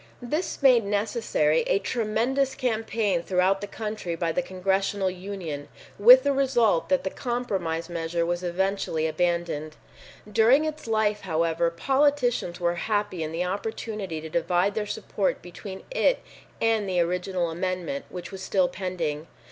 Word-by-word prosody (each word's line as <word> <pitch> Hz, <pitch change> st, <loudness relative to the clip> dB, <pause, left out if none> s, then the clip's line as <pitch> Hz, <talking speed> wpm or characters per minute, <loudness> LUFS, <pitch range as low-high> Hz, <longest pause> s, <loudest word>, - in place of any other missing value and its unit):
This 300 Hz, +5 st, -3 dB
made 250 Hz, -4 st, +6 dB
necessary 200 Hz, -7 st, +1 dB
a -, -, +3 dB
tremendous 235 Hz, +6 st, 0 dB
campaign 220 Hz, -6 st, 0 dB
throughout 185 Hz, +2 st, +1 dB
the 205 Hz, -, -4 dB
country 210 Hz, -5 st, -4 dB
by 165 Hz, 0 st, -1 dB
the 180 Hz, -, 0 dB
Congressional 190 Hz, +1 st, 0 dB
Union, 180 Hz, -6 st, -6 dB, 0.3 s
with 250 Hz, +5 st, +9 dB
the 285 Hz, -, +2 dB
result 245 Hz, -10 st, +2 dB
that 185 Hz, -, +2 dB
the 190 Hz, -, -2 dB
compromise 195 Hz, -10 st, -2 dB
measure 170 Hz, 0 st, -2 dB
was 175 Hz, +1 st, -1 dB
eventually 180 Hz, -2 st, -1 dB
abandoned. 160 Hz, -2 st, -1 dB, 0.5 s
During 230 Hz, +8 st, +4 dB
its 310 Hz, -4 st, -5 dB
life, 215 Hz, -2 st, +1 dB
however, 165 Hz, -1 st, +1 dB
politicians 250 Hz, -2 st, +1 dB
were 175 Hz, 0 st, 0 dB
happy 205 Hz, -4 st, 0 dB
in 155 Hz, 0 st, -3 dB
the 170 Hz, +2 st, -1 dB
opportunity 200 Hz, -2 st, -4 dB
to 160 Hz, -, -6 dB
divide 175 Hz, +4 st, +1 dB
their 210 Hz, 0 st, -2 dB
support 200 Hz, -1 st, -1 dB
between 190 Hz, +2 st, -9 dB
it -, -, +2 dB, 0.4 s
and 220 Hz, -3 st, +1 dB
the 180 Hz, -1 st, +1 dB
original 180 Hz, 0 st, 0 dB
amendment, 185 Hz, +10 st, -3 dB
which 180 Hz, +1 st, -7 dB
was 190 Hz, -1 st, -7 dB
still 190 Hz, -1 st, +2 dB
pending. 175 Hz, -4 st, -3 dB
190 Hz, 145 wpm, -26 LUFS, 175-225 Hz, 0.5 s, with